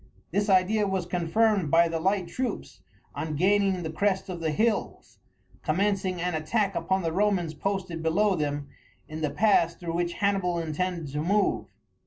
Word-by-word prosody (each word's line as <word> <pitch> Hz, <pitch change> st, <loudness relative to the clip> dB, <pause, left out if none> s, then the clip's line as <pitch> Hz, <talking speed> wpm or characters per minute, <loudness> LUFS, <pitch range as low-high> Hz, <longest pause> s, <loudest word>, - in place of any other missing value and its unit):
This 205 Hz, +1 st, 0 dB
idea 200 Hz, +3 st, +3 dB
was 190 Hz, -2 st, -1 dB
confirmed 180 Hz, +1 st, +1 dB
by 170 Hz, +3 st, +5 dB
the 165 Hz, 0 st, -2 dB
light 190 Hz, +1 st, 0 dB
troops, 255 Hz, +8 st, -4 dB, 0.3 s
on 155 Hz, -1 st, -4 dB
gaining 190 Hz, +2 st, +2 dB
the 160 Hz, -, -4 dB
crest 195 Hz, +3 st, 0 dB
of 180 Hz, -2 st, -5 dB
the 160 Hz, -1 st, -1 dB
hills, 215 Hz, +8 st, -1 dB, 0.4 s
commencing 185 Hz, +2 st, 0 dB
an 180 Hz, +1 st, -1 dB
attack 195 Hz, +6 st, 0 dB
upon 190 Hz, -1 st, 0 dB
the 165 Hz, -1 st, -1 dB
Romans 190 Hz, -4 st, +1 dB
posted 185 Hz, 0 st, -3 dB
below 190 Hz, +5 st, +2 dB
them 145 Hz, -3 st, -2 dB, 0.4 s
in 155 Hz, +1 st, -7 dB
the 150 Hz, -, 0 dB
pass 175 Hz, -3 st, +3 dB
through 170 Hz, -2 st, -5 dB
which 175 Hz, 0 st, -1 dB
Hannibal 195 Hz, -3 st, 0 dB
intended 165 Hz, 0 st, -2 dB
to 150 Hz, -, -2 dB
move. 190 Hz, -, +1 dB
180 Hz, 165 wpm, -27 LUFS, 165-200 Hz, 0.4 s, by